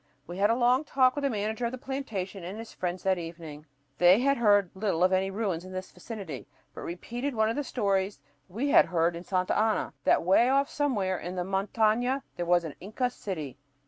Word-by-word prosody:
We 175 +4 -7
had 205 +1 +4
a 230 - +3
long 250 +3 +3
talk 255 -3 +3
with 290 - -3
the 280 - +1
manager 220 +1 -2
of - - -4
the 255 - -5
plantation 220 -9 -5
and 185 +5 -6
his 225 0 -9
friends 180 0 -4
that 190 -2 +2
evening. 165 -3 -9 0.3
They 180 +4 +7
had 275 +1 +2
heard 205 -5 +4
little 190 -4 0
of 185 +1 +4
any 190 +1 +2
ruins 195 -4 -2
in 185 0 -10
this 185 0 -6
vicinity, 180 - -8 0.3
but - - -8
repeated 240 +10 -4
one 220 0 +2
of - - -4
the 290 - -1
stories 200 - -1 0.3
we 240 +10 -2
had - - +7
heard 170 -1 +1
in 170 - -7
Santa 185 -1 0
Ana, 220 -5 +1
that - - +4
way 195 +8 +4
off 275 +2 +2
somewhere 205 -11 0
in 180 +1 -6
the 180 - -1
montaña 220 +7 +1
there 175 - -3
was 175 0 +4
"an 160 -3 -6
Inca 235 +6 -2
city." 155 - -6
200 Hz, 215 wpm, -28 LUFS, 180-240 Hz, 0.3 s, They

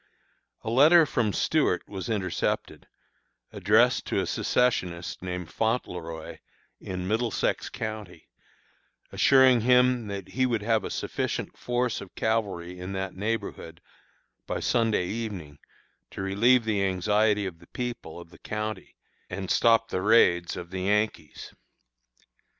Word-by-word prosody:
"A 110 - -3
letter 155 +7 +7
from 115 -7 0
Stuart - - +1
was 95 +1 -6
intercepted, 100 -5 -2 0.7
addressed - - +3
to - - 0
a - - 0
secessionist 90 -8 -1
named 90 -2 -5
Fontleroy, 90 -8 -3 0.4
in 90 -1 -5
Middlesex 110 +2 -1
County, 105 -6 -7 0.8
assuring 130 -3 +5
him 125 -1 +3
that 100 -2 -6
he 130 0 +1
would 115 -4 -1
have 110 -1 +1
a - - -4
sufficient - - -3
force 125 -1 -1
of 95 - -12
cavalry 95 -6 -2
in 90 +2 -6
that 95 -1 -3
neighborhood 100 -5 -4 0.7
by - - -2
Sunday 115 -6 +1
evening 95 -9 -5 0.5
to - - -6
relieve 115 +6 +3
the 105 -3 0
anxiety 105 +2 +1
of 85 -3 -6
the - - -18
people 120 -10 -6
of 85 -1 -13
the - - -16
county 110 0 -5 0.3
and 95 +1 -4
stop 115 -1 +4
the 95 - -2
raids 90 -5 +3
of 85 0 -8
the 95 -1 -4
Yankees. 105 -5 -1
105 Hz, 130 wpm, -27 LUFS, 90-115 Hz, 0.8 s, letter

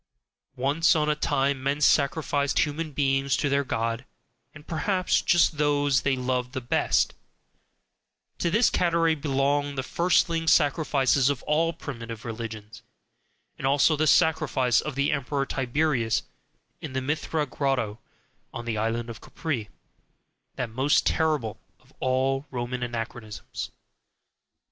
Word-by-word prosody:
Once 145 +5 +2
on 150 -1 +1
a - - 0
time 140 -2 0
men 140 +2 -1
sacrificed 140 0 +2
human 155 +1 0
beings 135 -2 +1
to 145 - 0
their 140 +1 +2
God, 115 -1 -2 0.5
and 155 -1 -14
perhaps 185 +4 0
just 170 -3 +3
those 145 -3 +2
they 135 -1 +1
loved 125 0 -2
the 130 - -2
best 120 - +1 1.3
to 170 - +1
this 215 +7 +3
category 170 -2 +2
belong 145 -1 0
the 130 - -2
firstling 170 0 +1
sacrifices 145 -4 +3
of 140 -3 -2
all 160 +2 +1
primitive 115 -8 -8
religions, 110 -2 -7 0.8
and 135 - -1
also 145 +3 +4
the 155 +1 +1
sacrifice 155 -7 +3
of 150 -2 -5
the 140 +1 +1
Emperor 140 -1 -1
Tiberius 130 -4 0 0.6
in - - -7
the 130 - -1
Mithra 150 +2 -1
Grotto 125 -6 -1 0.5
on 120 - -7
the 115 -2 -2
Island 115 +2 -1
of 115 -1 -9
Capri, 125 -10 -4 0.9
that 125 -3 -3
most 135 +6 +2
terrible 150 -10 0 0.2
of - - -26
all 135 +2 0
Roman 125 -1 -4
anachronisms. 115 -2 -5
140 Hz, 130 wpm, -26 LUFS, 125-150 Hz, 1.3 s, also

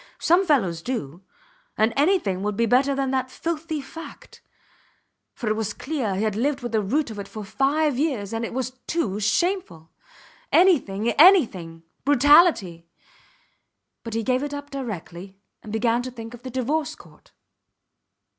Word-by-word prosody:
Some 355 +3 +3
fellows 190 - +1
do... 175 - -5 0.6
and 220 +1 +2
anything 280 - +1
would 205 0 -2
be 235 - +2
better 265 +4 +3
than 270 -1 -1
the 260 -1 +1
filthy 315 +1 -4
fact; 325 +4 -12 0.9
for 235 - -5
it 215 - +1
was 215 -1 -3
clear 255 -9 -3
he 200 - -1
had 215 -2 -1
lived 270 +4 -1
with 240 - -4
the 220 -2 +1
root 260 +6 -1
of 210 - -8
it 200 - -6
for 215 - -8
five 275 +4 +1
years 250 -10 -1
and 225 +1 -2
it - - -4
was 255 0 -3 0.2
too 215 - -1
shameful. 215 - -1 0.6
Anything! 235 - +3
Anything! 195 - +4 0.2
Brutality... 280 - +4 1.2
But 230 -1 -6
he 225 - -1
gave 255 +2 +1
it 290 0 -4
up 285 0 -8
directly, 195 -7 -7 0.2
and 215 - -10
began 230 +2 +1
to 255 - -5
think 230 -2 -9
of 240 - -11
the 260 - -7
Divorce 295 +5 -2
Court. - - -19
245 Hz, 160 wpm, -24 LUFS, 210-290 Hz, 1.2 s, Anything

